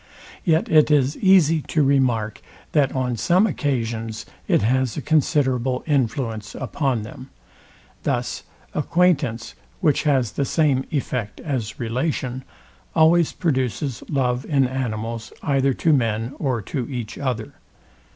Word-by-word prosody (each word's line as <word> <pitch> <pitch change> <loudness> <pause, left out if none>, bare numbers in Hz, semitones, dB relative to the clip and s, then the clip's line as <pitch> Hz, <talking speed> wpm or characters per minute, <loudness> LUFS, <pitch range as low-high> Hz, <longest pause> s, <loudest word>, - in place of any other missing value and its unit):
Yet 160 -2 +2
it 155 -1 +5
is 145 -1 +3
easy 175 -5 +4
to 155 - +2
remark, 125 -6 +1 0.3
that 145 -3 +3
on 125 -2 -1
some 175 - +3
occasions 115 - -2 0.2
it - - +3
has 130 +1 +1
a - - 0
considerable 130 -4 +1
influence 115 -6 -1
upon 130 -1 -1
them. 130 +4 -10 0.7
Thus 120 -3 -2 0.3
acquaintance, 150 - +1 0.3
which 150 - +2
has 135 -7 +1
the - - -1
same 140 -2 +1
effect 125 -7 -3
as 120 -8 -3
relation, 130 +1 -2 0.5
always 160 +1 +5
produces 130 - -1
love 125 -3 0
in 140 -3 +2
animals 115 -3 -4
either 135 -2 +2
to 160 - +2
men 115 -1 0
or 125 -7 -1
to 130 +6 -4
each 120 -5 -5
other. 125 -5 -3
130 Hz, 125 wpm, -22 LUFS, 115-150 Hz, 0.7 s, it